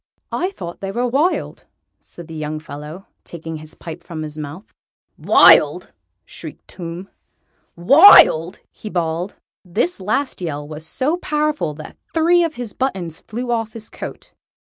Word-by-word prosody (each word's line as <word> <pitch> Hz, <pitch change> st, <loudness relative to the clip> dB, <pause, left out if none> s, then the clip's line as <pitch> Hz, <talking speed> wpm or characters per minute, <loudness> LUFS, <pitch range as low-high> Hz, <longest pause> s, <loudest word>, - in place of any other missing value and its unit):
"I 365 Hz, -, -1 dB
thought 175 Hz, -, -8 dB
they 195 Hz, 0 st, -4 dB
were 245 Hz, +4 st, -1 dB
wild," 290 Hz, +9 st, -1 dB, 0.3 s
said 170 Hz, -2 st, -13 dB
the 165 Hz, -, -10 dB
young 155 Hz, 0 st, -4 dB
fellow, 155 Hz, +4 st, -9 dB, 0.2 s
taking 165 Hz, -1 st, -7 dB
his 155 Hz, +1 st, -12 dB
pipe 165 Hz, +1 st, -9 dB
from 160 Hz, -2 st, -7 dB
his 150 Hz, -1 st, -7 dB
mouth. 155 Hz, +5 st, -8 dB, 0.4 s
"Wild!" -, -, +5 dB, 0.3 s
shrieked -, -, -11 dB
Tomb. 175 Hz, +1 st, -8 dB, 0.7 s
"Wild!!" 180 Hz, -, +7 dB
he 215 Hz, -, -9 dB
bawled. 170 Hz, +1 st, -2 dB, 0.3 s
This 195 Hz, -, -1 dB
last 215 Hz, +6 st, -2 dB
yell 145 Hz, -4 st, -4 dB
was 155 Hz, +1 st, -7 dB
so 295 Hz, -, 0 dB
powerful 300 Hz, -, -1 dB
that 155 Hz, -, -11 dB, 0.2 s
three 345 Hz, +2 st, +4 dB
of 325 Hz, -2 st, -2 dB
his 240 Hz, -4 st, -6 dB
buttons 185 Hz, -11 st, -3 dB
flew 240 Hz, +2 st, -5 dB
off 225 Hz, -2 st, -2 dB
his 225 Hz, -1 st, -9 dB
coat. -, -, -9 dB
180 Hz, 150 wpm, -19 LUFS, 160-255 Hz, 0.7 s, Wild